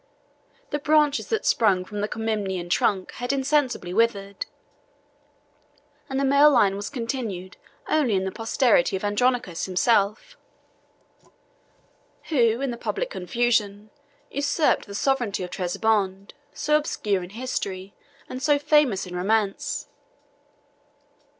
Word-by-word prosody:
The 295 - -1
branches 295 0 +2
that 445 - -1
sprang 190 -5 +3
from 205 +1 -5
the 205 - 0
Comnenian 205 -6 -3
trunk 190 0 +1
had 245 - 0
insensibly 270 -9 0
withered; 200 -2 0 1.6
and 270 0 -1
the 275 - +1
male 280 +2 +6
line 200 -9 +3
was 200 +1 -5
continued 230 -8 -4 0.3
only 275 -9 +2
in 190 0 0
the 190 - -2
posterity 225 -3 +2
of 190 - -4
Andronicus 205 -3 0
himself, 210 - +1 1.9
who, 240 -5 +2
in 275 -2 -1
the 235 - -6
public - - -3
confusion, 210 0 -1 0.4
usurped 285 0 +1
the 200 - -8
sovereignty 240 -6 0
of 180 - -7
Trebizond, 195 +1 -1 0.2
so 300 0 +2
obscure 210 -10 -1
in 175 - -8
history, 200 -4 -4 0.3
and 255 - -7
so 290 0 +3
famous 285 -9 +2
in 180 -1 -8
romance. 200 +2 0
225 Hz, 120 wpm, -24 LUFS, 195-270 Hz, 1.9 s, male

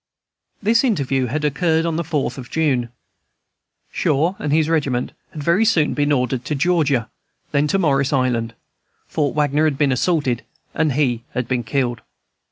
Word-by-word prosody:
This 230 +4 +3
interview 135 - +1
had 150 +5 -2
occurred 160 +3 +1
on 165 -1 -1
the 170 - 0
4th 150 -3 -2
of 125 - -9
June. 135 -7 0 1.0
Shaw 160 +7 +1
and 150 - -2
his 155 0 +3
regiment 140 -6 0 0.2
had 150 - -7
very 170 +8 +3
soon 175 -9 +2
been 145 0 +1
ordered 125 -2 0
to 150 - -2
Georgia, 145 -7 +1 0.4
then 145 0 +2
to 195 - +1
Morris 140 -6 +2
Island; 120 -4 0 0.5
Fort 145 -3 -1
Wagner 150 +1 +2
had 150 -3 +1
been 145 -2 +2
assaulted, 130 -2 0 0.3
and 155 -3 +1
he 125 -5 0
had 125 -2 -1
been 125 -1 0
killed. 120 0 -1
145 Hz, 165 wpm, -20 LUFS, 130-160 Hz, 1.0 s, This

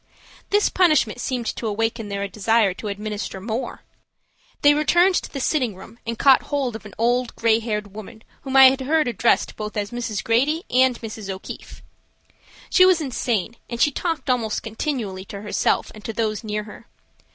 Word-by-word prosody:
This 410 +1 +3
punishment 305 - +2
seemed 245 -2 -2
to 230 - -4
awaken 225 0 -2
their 200 0 -3
desire 215 0 +2
to 210 - -7
administer 205 -1 -4
more. 225 +6 -4 0.8
They 290 0 +7
returned 345 +6 +3
to - - -10
the 275 - -5
sitting 255 -6 0
room 195 +5 -13
and 230 0 -3
caught 270 +1 +6
hold 275 -5 -2
of 215 -1 -8
an 200 - -14
old 240 +1 +1
gray 225 -1 +3
haired 210 -3 -4
woman 220 +1 -10 0.2
whom 270 -1 -5
I 265 -1 +10
have 270 - -3
heard 300 +2 +1
addressed 235 0 +1
both 215 0 -6
as 205 0 -2
Mrs. 230 -4 -3
Grady 280 +9 +1
and 255 -1 +3
Mrs. 220 -3 -7
O'Keefe. 190 0 -8 0.9
She 370 - +6
was 370 -2 +5
insane, 235 - -2
and 235 - -5
she 295 - +4
talked 330 +2 -3
almost 235 -4 0
continually 220 -5 -3
to 200 0 -8
herself 210 - 0
and 215 - -13
to 225 - -4
those 215 0 -2
near 210 -1 -3
her. 210 +2 -13
230 Hz, 180 wpm, -22 LUFS, 210-265 Hz, 0.9 s, I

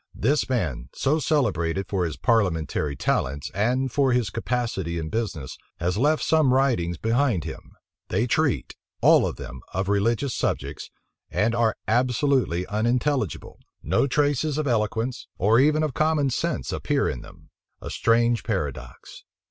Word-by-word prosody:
This 140 +6 +1
man, 75 - -2
so 150 +4 +1
celebrated 95 - 0
for 95 -3 0
his 80 - -4
parliamentary 80 - 0
talents, 70 +1 -1
and 125 +6 0
for 135 -1 +2
his 120 -5 +1
capacity 115 -8 -2
in 80 -1 -4
business, 100 - -4 0.2
has 90 +2 0
left 150 +8 +2
some 155 -5 +3
writings 115 -11 +1
behind 115 - +1
him: 80 - -9 0.3
they 110 +6 0
treat, 145 +3 0 0.3
all - - +6
of - - -4
them, 65 0 -9
of 95 +1 -1
religious 115 +6 +1
subjects, 70 +2 -3 0.4
and 105 +6 +1
are 115 -2 +2
absolutely 125 - +1
unintelligible: 115 - -1 0.2
no - - +2
traces 145 +1 +1
of 155 - -1
eloquence, 115 0 -1
or 110 +5 +4
even 150 +3 +3
of 150 -4 -1
common 155 -2 +1
sense, - - -2
appear - - 0
in - - -3
them. - - -15 0.3
A - - -7
strange 115 0 +2
paradox! 95 - -5
115 Hz, 145 wpm, -24 LUFS, 90-135 Hz, 0.4 s, all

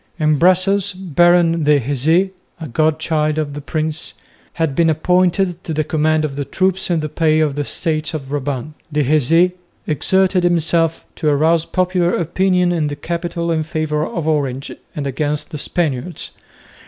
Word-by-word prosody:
In 155 -3 +2
Brussels 185 +2 +3
Baron 175 -2 +3
de 150 -1 +4
Héze 150 +9 +1 0.3
(a 160 - -6
god 155 +5 +1
child 155 -1 0
of 150 -2 -2
the 145 - -6
prince) 155 +1 -4 0.4
had 160 -4 -1
been 165 +3 +3
appointed 180 +2 +1
to 160 - -4
the 155 - +1
command 155 0 +1
of 140 -2 -5
the 145 - -2
troops 190 +6 0
in 170 -3 +1
the 155 - -2
pay 155 0 +1
of 155 -3 +1
the 145 - -2
Estates 155 +1 -2
of 135 -3 -6
Brabant. 145 0 -3 0.2
De 150 0 +1
Héze 155 +5 +3 0.3
exerted 185 +4 +2
himself 165 -1 +1
to 155 - +1
arouse 160 +3 +2
popular 180 -1 +1
opinion 180 +1 +1
in 160 -3 0
the 145 - -4
capital 170 +1 -3
in 160 -1 +1
favour 155 -1 -2
of 160 0 -4
Orange 140 -3 -1 0.2
and 145 - -3
against 145 +4 -2
the 150 - -5
Spaniards. 160 0 -2
160 Hz, 165 wpm, -18 LUFS, 150-175 Hz, 0.4 s, de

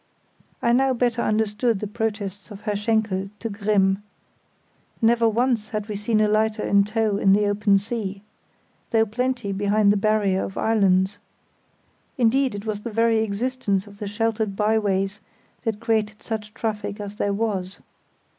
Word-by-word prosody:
I 235 - +3
now 265 +2 +3
better 235 -1 +1
understood 215 +1 +1
the 210 - -3
protests 205 -2 -4
of 205 -2 -10
Herr 210 -1 -2
Schenkel 205 -2 0
to 230 - -4
Grimm. 200 -1 +1 1.0
Never 230 0 +4
once 230 -1 0
had 210 -1 -3
we 210 - -4
seen 215 +2 0
a 215 - +4
lighter 215 +1 +1
in 200 0 +4
tow 215 -1 0
in 195 -1 +4
the 210 +1 +3
open 205 0 +3
sea, 200 -2 -4 0.7
though 225 -1 +3
plenty 245 -1 -2
behind 205 +1 +3
the - - 0
barrier 200 -2 +1
of 190 - -6
islands; 195 -2 +2 1.0
indeed 255 0 +2
it 205 +1 -7
was 210 -1 -3
the 235 - -5
very 225 0 +2
existence 220 -2 -1
of 200 -1 -15
the 205 - -4
sheltered 220 -1 -1
byways 205 -2 +1 0.5
that 220 -2 -1
created 220 -2 -1
such 215 -1 -5
traffic 210 -2 -3
as 205 0 -7
there 205 - 0
was. 200 -3 -2
210 Hz, 155 wpm, -23 LUFS, 200-225 Hz, 1.0 s, Never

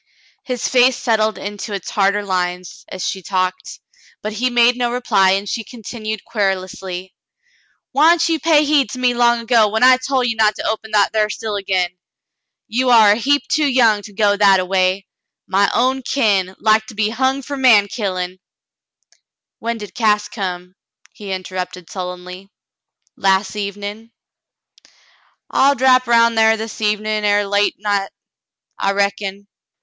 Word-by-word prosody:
His 250 -3 -3
face 250 0 +3
settled 220 -3 0
into 205 +1 -6
its 200 - -5
harder 200 0 +1
lines 180 -1 -3
as 185 - -5
she 190 - -4
talked, 185 0 -3 0.4
but 215 0 -4
he 245 +4 -1
made 240 0 +3
no 245 -1 -1
reply, 195 -6 +2
and 195 +1 -2
she 225 - -3
continued 220 -2 -7
querulously: 190 -3 -3 0.8
"Why'n't 325 +5 +4
you 325 -1 0
pay 305 -2 +3
heed 285 -5 +2
to - - -6
me 250 -1 +1
long 240 -1 +2
ago, 230 -2 +3
when 220 +3 -1
I 255 0 +7
tol' 260 0 -1
ye 240 -2 0
not 215 -1 +2
to - - -4
open 220 0 -3
that 205 0 +2
thar 215 -1 +1
still 215 0 -4
again? 185 -3 -2 0.7
You 250 +3 0
are 220 -4 +6
a - - +4
heap 285 +6 0
too 305 -2 +1
young 235 -6 +3
to 205 - -12
go 205 0 +2
that 200 -2 +4
a 185 - -2
way, 185 +1 0 0.2
— - - -61
my 200 +1 +2
own 260 +2 +1
kin, 200 -8 0
like 220 0 +2
to 220 - -11
be 210 0 0
hung 265 +3 -1
fer 285 +2 -5
man 235 -7 +4
killin'." 185 -3 -4 1.2
"WTien 230 0 -3
did 210 -2 -9
Cass 210 -3 +1
come?" 180 -4 -6 0.4
he 200 -2 -9
interrupted 185 -1 -6
sullenly. 180 +1 -7 0.7
Las 195 +1 +1
evenm. 205 +2 -6 1.4
"I'll 280 +1 +3
drap 255 -1 +3
'round 230 0 +4
thar 220 0 +4
this 220 0 -7
evenin' 215 0 -1
er 205 0 +2
late 205 +1 +1
night, 200 -1 -1 0.7
I 195 - 0
reckon. 200 0 -2
210 Hz, 160 wpm, -18 LUFS, 195-240 Hz, 1.4 s, I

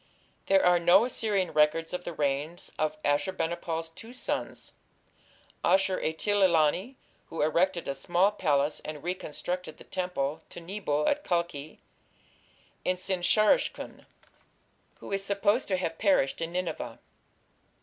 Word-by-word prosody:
There 195 0 +4
are 175 -1 +5
no 175 +6 +6
Assyrian 210 -6 0
records 155 +2 +2
of 180 0 -4
the - - -3
reigns 150 +2 -2
of 155 0 0
Ashur 145 +5 +1
bani 170 -2 -1
pal's 165 -1 -3
two 225 +9 -12
sons, 255 - -4 0.9
Ashur 190 +1 +3
etil 205 +6 0
ilani 180 - +3 0.3
who 165 - -1
erected 170 +3 +1
a 140 - -1
small 175 +8 +2
palace 150 -7 +1
and 150 -2 -7
reconstructed 180 -1 -4
the - - -13
temple 170 -6 -2
to - - -9
Nebo 170 -5 -2
at 295 0 +1
Kalkhi 170 -4 -2 1.1
and 185 - 0
Sin 185 0 -1
shar 215 +4 +5
ishkun, - - -5 0.9
who - - -9
is 195 0 -1
supposed 205 +4 +1
to 190 - +1
have 165 -3 -3
perished 190 -9 +2
in 165 +1 -3
Nineveh. 175 -10 -3
175 Hz, 140 wpm, -29 LUFS, 155-195 Hz, 1.1 s, no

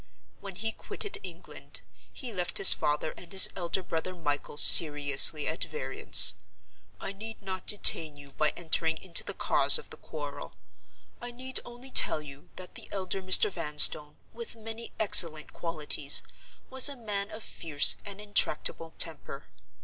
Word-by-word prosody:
When 195 -2 -13
he 225 +4 -6
quitted 410 - -6
England, 175 -1 -13 0.3
he 245 -4 -12
left 180 -2 -3
his 195 - +6
father 150 +1 -5
and 175 - -14
his 190 -1 +5
elder 180 +1 -5
brother 175 +2 -7
Michael 145 -3 -7
seriously 145 -1 +5
at 160 +3 -2
variance. 465 - +4 0.7
I - - -8
need 220 +3 -11
not 190 -2 -10
detain 160 -7 +2
you 140 -1 -16
by 150 +3 -3
entering 160 -1 -3
into 175 +1 -3
the - - -8
cause - - +1
of 465 - -15
the - - -12
quarrel. - - -12 0.7
I 240 - -9
need 255 +2 -4
only 245 +2 -14
tell 155 - +5
you 145 -2 -15
that 185 -1 -13
the - - -14
elder 195 0 -6
Mr. 185 +2 +4
Vanstone, 150 -3 -1 0.2
with 235 0 -9
many 225 +1 -11
excellent 165 -7 +2
qualities, 150 -3 +1 0.5
was 265 +2 +6
a 285 - -8
man 205 -4 -7
of 215 0 -11
fierce 150 -4 +2
and 200 -1 -11
intractable 165 -5 -3
temper. - - -3
185 Hz, 155 wpm, -25 LUFS, 155-215 Hz, 0.7 s, his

